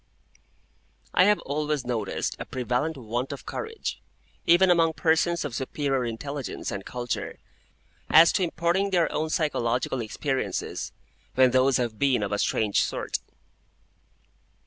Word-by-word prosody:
I 180 - +6
HAVE 210 +1 +5
always 150 -1 -2
noticed 115 -5 -2
a - - -5
prevalent 130 +5 -2
want 120 +2 -3
of 140 - -7
courage, 450 0 -5 0.5
even 180 +2 +6
among 165 -2 +4
persons 165 +1 +1
of 140 - -4
superior 135 0 -1
intelligence 135 +4 -5
and 100 -1 -4
culture, 120 +2 -4 0.7
as 165 +1 +8
to - - 0
imparting 175 +3 +1
their 175 -3 +2
own 155 +1 -1
psychological 130 -6 0
experiences 130 +5 -3 0.4
when 130 -1 +5
those 130 +1 +4
have 115 -4 -2
been 135 -6 +2
of 100 - -3
a 105 - 0
strange 105 -2 +2
sort. - - -2
135 Hz, 130 wpm, -26 LUFS, 125-165 Hz, 0.7 s, as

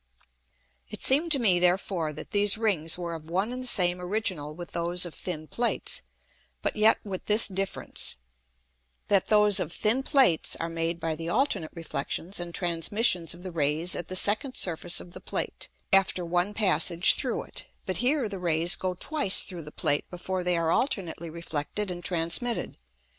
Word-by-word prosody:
It - - -5
seemed 305 +6 +3
to - - +5
me 200 -8 +3
therefore 180 -2 0
that 150 - -10
these 205 -1 +4
Rings 180 -8 +1
were 170 -1 -5
of 160 -1 -9
one 195 +7 -1
and 255 - -5
the 255 - -2
same 180 -5 +4
original 180 -6 -3
with 175 0 -9
those 175 +1 -1
of 170 - -8
thin 155 -4 -6
Plates, 240 +7 -1 0.6
but - - -1
yet 220 +1 +4
with 195 -3 -7
this 215 +2 +6
difference, 195 0 -3 0.9
that 200 -2 +3
those 210 -2 +4
of - - -3
thin 220 +8 +1
Plates 265 - +2
are 165 - -4
made 165 +1 -2
by 165 -1 -2
the 165 +2 -6
alternate 205 - 0
Reflexions 165 +3 -4
and 175 0 -6
Transmissions 175 0 0
of 175 - -14
the 185 - -6
Rays 160 +2 0
at 175 - -5
the 185 - -5
second 215 +8 +3
Surface 175 0 +1
of 175 - -12
the - - -10
Plate, - - -4 0.3
after 190 -2 +3
one 175 +4 -1
passage 185 -4 +4
through - - -3
it; - - -9 0.2
but 185 -2 -2
here 255 - +1
the 200 -2 -7
Rays 170 +1 +2
go 185 -1 -3
twice 285 - +4
through 180 -4 -6
the 150 -1 -10
Plate 145 -1 -1
before 185 +1 -4
they 180 -1 +1
are 165 -1 0
alternately 180 - -1
reflected 170 +4 -4
and 175 0 -7
transmitted. 175 +8 -2
180 Hz, 180 wpm, -27 LUFS, 170-210 Hz, 0.9 s, this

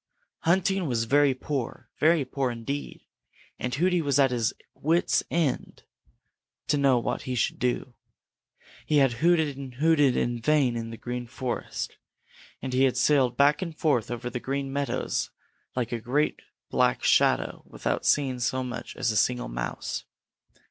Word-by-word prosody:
Hunting 190 +1 +2
was 120 -3 0
very 140 +3 +3
poor, 135 -2 -4
very 155 -2 +4
poor 130 0 -1
indeed, 120 +5 -5 0.5
and 125 0 -2
Hooty 180 +3 +2
was 140 -3 +1
at 135 -2 +4
his 115 -3 +1 0.2
wits' 165 +4 +2
end 160 -6 -1 0.9
to 150 - +4
know 135 -3 +4
what 120 - -2
he 125 - -1
should 115 - 0
do. 125 0 -1 0.9
He 150 - +3
had 135 -4 +4
hooted 160 -4 +3
and 135 -3 -8
hooted 145 -2 +3
in 120 0 0
vain 140 -2 +3
in 115 -1 -4
the 115 - -8
Green 120 +1 -5
Forest, 125 0 -4 0.7
and 130 -1 -3
he 130 +1 +4
had 125 -1 +1
sailed 130 -1 +3
back 145 +4 +4
and 165 -4 -5
forth 135 -9 +1
over 120 0 -4
the 125 - -3
Green 135 +1 -3
Meadows 140 0 -1 0.5
like 125 -2 -1
a 120 -2 -3
great 140 +7 0 0.3
black - - +2
shadow - - +3
without - - -2
seeing 135 -3 +2
so 130 +2 0
much 125 -1 -6
as 115 - 0
a - - -3
single 125 +3 +1
Mouse. - - -4
135 Hz, 160 wpm, -27 LUFS, 125-145 Hz, 0.9 s, very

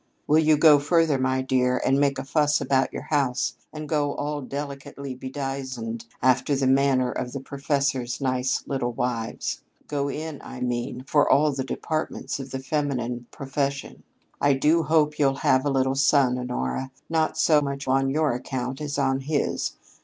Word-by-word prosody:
Will 155 +2 +4
you 155 -1 +4
go 150 -1 +7
further, 155 -1 +2
my 130 0 +1
dear, 125 -1 +1
and 135 +1 +3
make 140 -1 +2
a 130 - -3
fuss 150 +2 +2
about 135 -1 +1
your - - -6
house 135 -4 +1 0.2
and 155 -1 -7
go 145 -2 0
all 145 0 -3
delicately 140 0 -6
bedizened 130 -3 -5 0.2
after 130 +3 +3
the 135 0 0
manner 130 -1 +3
of 125 - -4
the 140 - -3
professors' 135 -2 -1
nice 130 -1 0
little 125 -3 -2
wives 115 -2 -3 0.3
go 140 -1 -1
in, 155 +1 -5
I 125 - -8
mean, 125 0 -3
for 145 +1 +3
all 150 +1 +4
the 135 -1 -3
departments 155 +2 -3
of 135 0 -7
the 135 - -4
feminine 130 -4 -2
profession? 140 0 -3 0.4
"I 145 0 +4
do 150 +5 +3
hope 150 -1 +2
you'll 135 -2 +3
have 130 0 +2
a - - +2
little 135 -1 +1
son, 135 -2 +3
Honora, 125 - -3 0.2
not 160 -1 0
so 155 -1 +4
much 140 -1 -4
on 135 +1 +2
your 155 +2 +1
account 130 +2 -4
as 145 -1 -3
on 135 -1 +1
his. 145 +2 -1
135 Hz, 170 wpm, -25 LUFS, 130-145 Hz, 0.4 s, go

